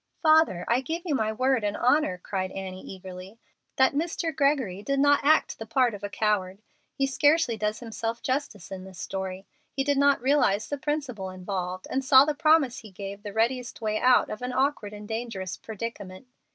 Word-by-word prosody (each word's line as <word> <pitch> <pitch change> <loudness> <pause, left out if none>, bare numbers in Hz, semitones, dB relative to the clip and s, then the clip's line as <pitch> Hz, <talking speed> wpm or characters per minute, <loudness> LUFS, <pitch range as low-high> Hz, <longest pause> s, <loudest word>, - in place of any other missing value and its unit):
"Father, 310 - +4
I 240 +2 +2
give 325 +6 -4
you 320 - -1
my 220 -5 0
word 255 +1 +1
and 205 0 -1
honor," 255 -5 +2
cried 185 +1 -3
Annie, 190 -1 -6
eagerly, 190 +2 -10 0.4
"that 265 +1 +4
Mr. 325 +1 -2
Gregory 265 -9 +1
did 275 +5 -1
not 285 +1 +4
act 310 +2 +3
the 220 - -7
part 240 +1 +2
of 205 -1 -9
a 205 - -3
coward. 200 -3 0 0.4
He 275 - +1
scarcely 290 -1 +3
does 215 +1 -2
himself 230 0 -4
justice 260 - -3
in 190 -1 -6
his 190 -1 -12
story. 190 0 -5 0.3
He 270 - 0
did 285 0 +1
not 280 0 +4
realize 245 -6 +2
the 285 - -3
principle 270 -10 -3
involved, 185 0 -4
and 265 - -1
saw 260 0 +8
in 280 - +3
the - - +1
promise 295 -4 +3
he 220 -5 -12
gave 200 +1 -8
the 205 -1 -7
readiest 240 +3 -1
way 215 -1 -1
out 250 0 +4
of 215 - -6
an 250 0 -3
awkward 260 -5 0
and 210 0 -9
dangerous 220 -5 -4
predicament. 215 -2 -7
230 Hz, 195 wpm, -27 LUFS, 195-275 Hz, 0.4 s, saw